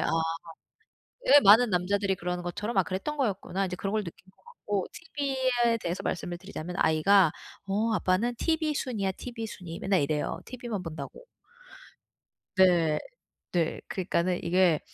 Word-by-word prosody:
아 - - 0 1.2
예. 290 - +9
'많은 220 +4 +7
남자들이 195 +1 +1
그러는 180 0 -4
것처럼 205 +5 -3
아 190 - +5
그랬던 195 - -4
거였구나.' 195 -5 -1
이제 180 - -4
그런 195 +2 -3
걸 215 -1 +1
느낀 170 - -9 0.2
것 - - -31
같고 205 - -3
티브이에 260 -6 0
대해서 180 +3 -3
말씀을 175 0 -3
드리자면 180 -2 -7
아이가 160 +2 +5 0.4
"어 220 +3 +1
아빠는 215 +6 +1
티비순이야 285 - 0
티비순이." 220 -9 -7
맨날 190 -4 +2
이래요, 150 +1 -1
티브이만 235 -6 -5
본다고. 160 - -8 1.3
네. 175 -5 +4 0.5
네. 170 -3 0
그러니까는 185 -4 -1
이게 175 -2 +3
195 Hz, 335 characters per minute, -28 LUFS, 175-235 Hz, 1.3 s, 예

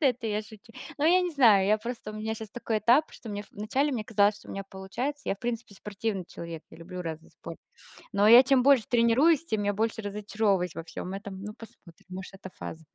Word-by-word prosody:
Но 295 - +4
это 250 -2 0
я 210 0 -1
шучу. 220 +2 -15 0.3
Но 290 - 0
я 355 +3 +5
не 360 -1 -1
знаю, 225 - +5
я 215 +2 +3
просто, 235 -1 -6
у - - -9
меня 220 +1 -3
щас 220 -1 -8
такой 225 -1 -2
этап, 240 +9 +4
что 230 - -11
мне 205 -1 -4
в - - -25
начале 260 +8 -1
мне 225 -4 -3
казалось, 210 -1 +3
что - - -17
у - - -7
меня 195 0 -5
получается. 240 +10 -4
Я, - - +1
в - - -43
принципе, 230 -2 -4
спортивный 200 -1 -4
человек. 165 -2 -8
Я - - -14
люблю 180 +2 -8
разный 160 -1 -7
спорт. - - -10 0.5
Но 200 +1 +4
я 240 +3 +10
чем 265 -1 +4
больше 275 -4 +5
тренируюсь, 255 +7 +4
тем 220 -10 -1
я 205 - +1
больше 220 +2 -1
разочаровываюсь 205 -3 -1
во 165 - -6
всём 180 +3 -7
этом. 195 -1 -7
Ну, 210 +1 -6
посмотрим, 215 -7 -16
может, 185 +1 -8
это 190 -1 -10
фаза. 160 0 -8
215 Hz, 235 wpm, -28 LUFS, 195-240 Hz, 0.5 s, я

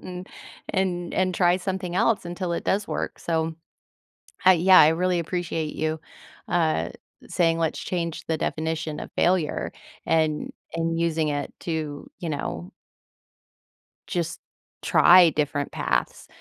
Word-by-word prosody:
and 180 0 -8 0.4
and 175 -2 -1
and 185 -1 +1
try 175 -1 +3
something 185 -1 -3
else 220 -4 +2
until 175 0 -3
it 170 - -2
does 200 +2 0
work, - - -3
so, 160 -1 -1 0.9
uh, - - +10
yeah, 185 +1 +6
I 150 - +8
really 180 +2 +1
appreciate 165 -2 -3
you, 155 0 -1 0.5
uh, 160 - +1 0.4
saying, 165 -1 +1
"Let's 160 -1 -1
change 170 -3 -3
the 160 -1 0
definition 160 0 -2
of - - -8
failure," 175 -4 +1 0.4
and 155 -2 +1 0.2
and 165 0 -1
using 160 -2 +1
it 145 -1 -3
to, 155 -3 -4
you 170 - -4
know 90 - -4 1.4
just 170 -2 -2 0.4
try 175 -1 +7
different 145 -1 -1
paths. 60 -1 -2
165 Hz, 130 wpm, -25 LUFS, 155-180 Hz, 1.4 s, uh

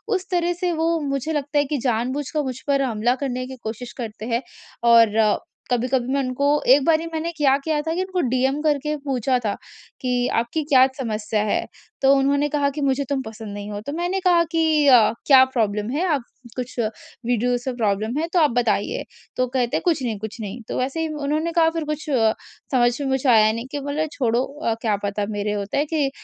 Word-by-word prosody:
उस 375 -1 -3
तरह 350 -1 +1
से 360 -1 +1
वो 330 +1 +1
मुझे 275 +3 -2
लगता 290 0 -2
है 290 - +3
कि 290 +1 -2
जानबूझकर 260 +5 -1
मुझ 260 -2 -4
पर 280 -1 +2
हमला 240 -1 +1
करने 255 -2 -3
की 260 - -8
कोशिश 230 +2 -6
करते 220 -3 -6
हैं। 235 +1 0 0.5
और 230 -2 +6 0.5
कभी-कभी 250 +1 0
मैं 280 - +2
उनको 260 +2 -1 0.3
एक 280 0 +4
बारी 325 0 +3
मैंने 320 +1 -2
क्या 275 -3 +4
किया 300 +1 -1
था 320 +1 -2
कि 365 - 0
उनको 375 -1 -3
डीएम 265 +3 +1
करके 300 0 0
पूछा 260 -2 +1
था 205 - +1 0.5
कि 250 -2 0
आपकी 240 +7 -2
क्या 270 -3 +5
समस्या 215 -4 -2
है? 210 - 0 0.4
तो 270 0 +6
उन्होंने 280 +2 +2
कहा 285 -1 +1
कि 285 +2 -5
मुझे 275 0 +1
तुम 280 -2 0
पसंद 220 -3 -8
नहीं 205 0 -6
हो 205 - -4
तो 285 - -4
मैंने 350 +4 -1
कहा 345 -2 +5
कि 315 -3 +2
अ, 245 -5 +7 0.2
क्या 265 -2 +8
प्रॉब्लम 215 -5 -1
है? 310 +7 0
आप 295 -7 0 0.3
कुछ 250 0 -5 0.5
वीडियोज़ 245 +1 +1
से 260 - -2
प्रॉब्लम 220 +2 -1
है 325 - -1
तो 360 - +4
आप 300 -5 +4
बताइए। 215 -4 0 0.3
तो 255 - +1
कहते 245 -1 0
हैं - - -3
कुछ 325 -6 +1
नहीं, 225 -4 -2
कुछ 220 +3 -7
नहीं 210 +3 -6
तो - - -4
वैसे 270 +5 -2
ही 325 - 0 0.2
उन्होंने 310 +4 0
कहा 330 -1 +4
फिर 325 -1 -3
कुछ 305 +1 -4 0.7
समझ 240 -1 +2
में 280 - -2
मुझे 265 0 +1
आया 215 -2 +6
नहीं 230 +3 -5
कि 290 - -3
बोला 285 +2 -2
छोड़ो 245 -2 0 0.4
क्या 215 -3 +1
पता 205 0 -1
मेरे 205 0 -2
होता 205 +2 -3
है 290 - +2
कि 300 -3 0
265 Hz, 210 wpm, -22 LUFS, 235-295 Hz, 0.7 s, क्या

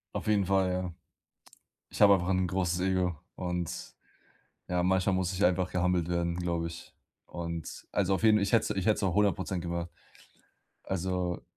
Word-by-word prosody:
Auf - - -4
jeden 105 -2 +3
Fall, 95 -1 +2
ja. 90 -1 -3 1.0
Ich - - -8
habe 100 -1 +9
einfach 90 -2 +1
'n 95 -1 +2
großes 90 -1 0
Ego 90 -3 0 0.2
und, 90 -2 -2 1.0
ja, 90 0 +1
manchmal 95 +1 +2
muss 95 0 0
ich 95 +2 -1
einfach 90 0 +2
gehumbled 90 -2 +1
werden, 85 -1 -1
glaube 85 -2 -1
ich. 85 0 -10 0.3
Und, 85 -2 -6
also, 100 -1 +1
auf 95 - -5
jeden 110 -1 +6
ich 100 +3 -1
hätte's 115 - +3
ich 95 -2 -2
hätte 110 - +4
es - - -4
auch 95 -3 +1
100% 95 -2 +1
gemacht. 85 0 -3 1.0
Also, 90 -1 -2
90 Hz, 170 wpm, -30 LUFS, 85-95 Hz, 1.0 s, habe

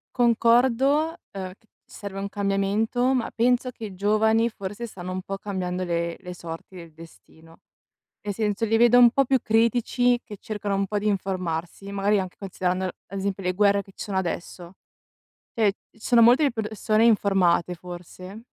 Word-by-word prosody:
Concordo, 245 +6 +3 0.2
uhm, 190 -2 -6
c - - -31 0.2
serve 200 -1 -8
un 200 0 -4
cambiamento, 205 +6 0
ma 250 -3 -1
penso 245 +2 +1
che 230 - -8
i 200 -3 -8
giovani 220 +4 +2
forse 205 +1 -6
stanno 185 -5 -8
un 185 0 -3
po' 195 +1 -5
cambiando 185 -2 -3
le 170 -1 -2
le 180 -2 -8
sorti 170 +1 -9
del 170 -3 -11
destino. 165 0 -16 0.6
Nel 205 - -4
senso, 210 +1 -1
li 225 +1 +2
vedo 240 +1 +6
un 240 -1 +8
po' 275 +2 +3
più 265 0 +2
critici, 240 +2 +2
che 210 - -10
cercano 205 -2 -3
un 195 0 0
po' 210 - -2
di 205 +1 -1
informarsi, 185 -1 -3
magari 200 +1 +1
anche 185 -1 -5
considerando, 185 -1 -2
ad 185 +1 -8
esempio 195 0 -3
le 180 0 0
guerre 200 +1 +3
che 195 - -17
ci - - -6
sono 200 -3 -3
adesso. 175 -1 -4 0.8
Eh, 210 -4 +2 0.2
ci - - -25
sono 235 +1 +4
molte 245 +6 +6
i 280 - +2
persone 215 0 0
informate, 195 -6 +3
forse 180 +4 -10
200 Hz, 175 wpm, -25 LUFS, 185-230 Hz, 0.8 s, un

